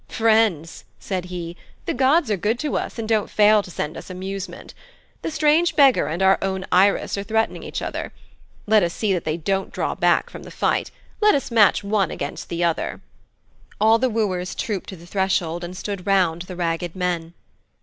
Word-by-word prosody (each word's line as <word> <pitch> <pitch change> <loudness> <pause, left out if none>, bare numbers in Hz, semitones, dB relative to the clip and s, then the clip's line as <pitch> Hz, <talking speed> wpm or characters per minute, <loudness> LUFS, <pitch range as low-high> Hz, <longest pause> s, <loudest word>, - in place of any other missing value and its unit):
'Friends,' 220 -8 +1 0.2
said 185 -2 -3
he, 175 -2 -6 0.3
'the - - -1
gods 265 0 +3
are - - +3
good 210 +5 0
to 295 +3 -2
us, - - -3
and 225 -1 -4
don't 215 -2 +1
fail 210 0 +5
to 190 - -12
send 155 -2 -4
us - - -9
amusement. 190 +1 -6 0.5
The - - -3
strange 310 +2 +2
beggar 275 -3 +5
and 170 +5 -2
our 190 0 +5
own 190 -1 -2
Irus 195 +2 +3
are - - -3
threatening 220 +2 -1
each - - -5
other. - - -4 0.5
Let 215 0 +4
us 170 -2 -1
see 210 -3 0
that 180 - -2
they 155 +1 -1
don't 195 +4 -2
draw - - -2
back - - +1
from - - -9
the - - -10
fight. - - 0 0.3
Let 420 0 +5
us 275 -3 -2
match 210 -2 +4
one 200 -3 +1
against 140 - -6
the 170 0 -2
other.' 170 -1 -1 0.8
All 220 +2 +5
the 255 +1 +2
wooers 190 -5 -1
trooped 205 -5 -3
to 190 - -7
the 170 -1 -14
threshold 175 -3 -1
and 180 +1 -7
stood 200 -1 -5
round 180 -4 +2
the 180 +1 -8
ragged 170 0 -2
men. 175 -2 -2
195 Hz, 195 wpm, -22 LUFS, 175-220 Hz, 0.8 s, fail